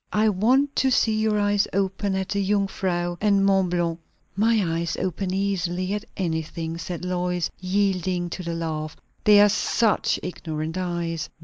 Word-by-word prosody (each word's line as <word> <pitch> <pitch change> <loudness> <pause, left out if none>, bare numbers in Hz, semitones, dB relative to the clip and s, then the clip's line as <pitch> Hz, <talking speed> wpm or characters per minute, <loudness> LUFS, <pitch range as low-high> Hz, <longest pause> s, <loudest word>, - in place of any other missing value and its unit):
I 215 +1 +3
want 255 +9 +2
to 265 - +3
see 225 -3 +2
your 215 -1 +1
eyes 205 0 +2
open 195 +1 0
at 190 0 -2
the 200 - -1
Jung 200 +1 +2
Frau, 175 -2 -2
and 200 -2 +3
Mont 195 -2 +3
Blanc." 170 -1 -1 0.4
"My 220 +3 +3 0.2
eyes 170 -1 -2
open 185 +1 -2
easily 185 -1 -1
at 210 +1 -3
anything," 165 -1 -3
said 175 +1 -5
Lois, 180 -1 -1
yielding 185 -2 0
to - - -5
the 170 -1 -4
laugh; 155 -2 -4 0.3
"they 210 -1 +7
are 205 - +8
such 215 +2 +1
ignorant 160 -2 -4
eyes." 170 -3 -3
185 Hz, 165 wpm, -24 LUFS, 175-205 Hz, 0.4 s, are